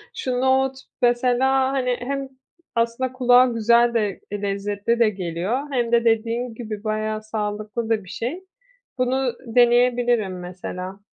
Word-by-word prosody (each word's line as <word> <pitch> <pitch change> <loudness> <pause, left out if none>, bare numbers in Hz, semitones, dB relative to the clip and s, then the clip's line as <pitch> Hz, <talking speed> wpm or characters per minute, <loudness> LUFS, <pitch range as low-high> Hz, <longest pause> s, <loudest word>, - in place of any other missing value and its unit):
Şu 250 -1 -2
nohut 265 0 +2 0.2
mesela, 255 +2 +2
hani, 250 -2 0
hem 275 +1 -4 0.5
aslında 235 +2 0
kulağa 250 -1 +5
güzel 235 0 +3
de 210 -3 -1
lezzetli 205 +3 -1
de 230 - +5
geliyor 190 - -3
hem 240 -3 0
de 235 0 +3
dediğin 230 +2 0
gibi 215 -3 -6
bayağı 215 0 -2
sağlıklı 215 +1 -4
da 220 -3 +1
bir 185 - -14
şey. 305 - -5 0.5
Bunu 255 0 +1
deneyebilirim 240 -4 +3
mesela. 180 +2 -7
235 Hz, 130 wpm, -22 LUFS, 215-250 Hz, 0.5 s, kulağa